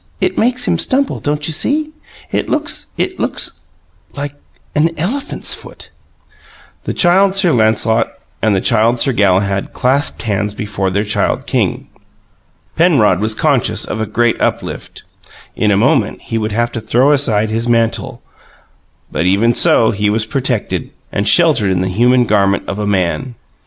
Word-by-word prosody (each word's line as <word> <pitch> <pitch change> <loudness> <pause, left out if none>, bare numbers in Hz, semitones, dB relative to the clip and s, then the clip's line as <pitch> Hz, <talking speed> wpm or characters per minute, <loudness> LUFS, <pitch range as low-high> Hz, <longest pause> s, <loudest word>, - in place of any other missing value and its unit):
It 370 - 0
makes 245 +2 0
him - - +1
stumble. 275 +1 +1
Don't 150 0 -2
you 160 - -1
see? 300 - 0 0.4
It - - -2
looks - - -1
it 370 - -2
looks - - -2 0.5
like 145 -1 -4 0.4
an 155 +2 +2
elephant's 270 - -2
foot!" - - -9 0.9
The - - -2
Child 190 +2 +3
Sir 190 -3 +4
Lancelot 110 0 +2 0.3
and 110 -2 +2
the 95 - 0
Child 115 0 +2
Sir 135 - +2
Galahad 100 -2 +1
clasped 135 +3 0
hands 105 -1 -2
before 100 -2 -3
their 100 +2 -1
Child 105 0 -1
King. - - -1 0.9
Penrod 140 - +3
was 110 +1 -1
conscious 120 -6 +1
of 110 - -4
a 110 - -2
great 120 +2 0
uplift; - - -3 0.5
in 105 - +1
a 100 - +3
moment 115 0 +1
he 115 - -3
would 110 0 -3
have 120 +3 -1
to 115 - -5
throw 125 +6 +2
aside 110 -7 +2
his 115 +2 -1
mantle, 120 +2 0 0.9
but 85 +4 -1
even 105 +6 +3
so 110 - +4
he 105 -1 0
was 110 +1 0
protected 125 -1 -2 0.2
and 100 +2 -2
sheltered 140 - +4
in 90 -1 0
the 95 - -1
human 120 +6 +3
garment 100 -2 +1
of 100 - -4
a 105 - -2
man. 100 +6 -1
115 Hz, 160 wpm, -15 LUFS, 105-140 Hz, 0.9 s, Sir